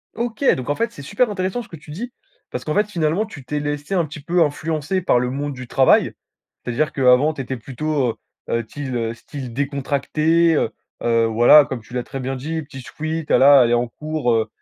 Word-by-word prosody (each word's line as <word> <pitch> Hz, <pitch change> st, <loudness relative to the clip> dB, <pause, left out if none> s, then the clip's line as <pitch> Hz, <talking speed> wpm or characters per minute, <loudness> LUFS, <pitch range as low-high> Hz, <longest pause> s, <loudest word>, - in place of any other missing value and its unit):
OK, 235 Hz, +3 st, -3 dB
donc 130 Hz, +1 st, -6 dB
en 145 Hz, -, +1 dB
fait, 230 Hz, +6 st, -1 dB
c'est 140 Hz, -, -11 dB
super 210 Hz, -, 0 dB
intéressant 190 Hz, +3 st, -2 dB
ce 230 Hz, -, -18 dB
que 165 Hz, -, -9 dB
tu 150 Hz, +1 st, -17 dB
dis, 235 Hz, +11 st, -6 dB, 0.4 s
parce -, -, -6 dB
qu'en 155 Hz, -, -1 dB
fait, 210 Hz, +1 st, +2 dB
finalement, 170 Hz, +3 st, 0 dB
tu 150 Hz, -12 st, -11 dB
t'es 150 Hz, +2 st, -2 dB
laissé 145 Hz, +4 st, -3 dB
un 175 Hz, -3 st, +2 dB
petit 150 Hz, +1 st, -9 dB
peu 170 Hz, +3 st, +2 dB
influencer 155 Hz, +4 st, -2 dB
par 125 Hz, -, +3 dB
le 125 Hz, 0 st, -1 dB
monde 145 Hz, +2 st, -3 dB
du 130 Hz, -1 st, -9 dB
travail. 130 Hz, +2 st, +4 dB, 0.5 s
C'est-à-dire 125 Hz, +6 st, 0 dB
qu'avant 135 Hz, +3 st, +4 dB
tu 140 Hz, -, -5 dB
étais 130 Hz, 0 st, -4 dB
plutôt, 135 Hz, +3 st, -2 dB, 0.4 s
heu -, -, -1 dB
heu, 115 Hz, -, 0 dB
tyle, 135 Hz, -4 st, -5 dB
heu, 115 Hz, -1 st, -1 dB
style 125 Hz, 0 st, -8 dB
décontracté, 150 Hz, +4 st, +1 dB
heu -, -, +1 dB, 0.3 s
heu, 115 Hz, -1 st, +2 dB
voilà 120 Hz, +7 st, +7 dB
comme 125 Hz, -3 st, -5 dB
tu 120 Hz, -, -16 dB
l'as 125 Hz, -, -2 dB
très 135 Hz, -, -7 dB
bien 130 Hz, +1 st, -3 dB
dit, 160 Hz, +5 st, -4 dB
petit 140 Hz, -3 st, -10 dB
sweat, 155 Hz, +4 st, -4 dB
voilà, 140 Hz, 0 st, +7 dB
allez 120 Hz, 0 st, +3 dB
en 120 Hz, 0 st, +1 dB
cours, 150 Hz, -3 st, -2 dB
heu, 110 Hz, -1 st, +1 dB
145 Hz, 220 wpm, -21 LUFS, 125-160 Hz, 0.5 s, voilà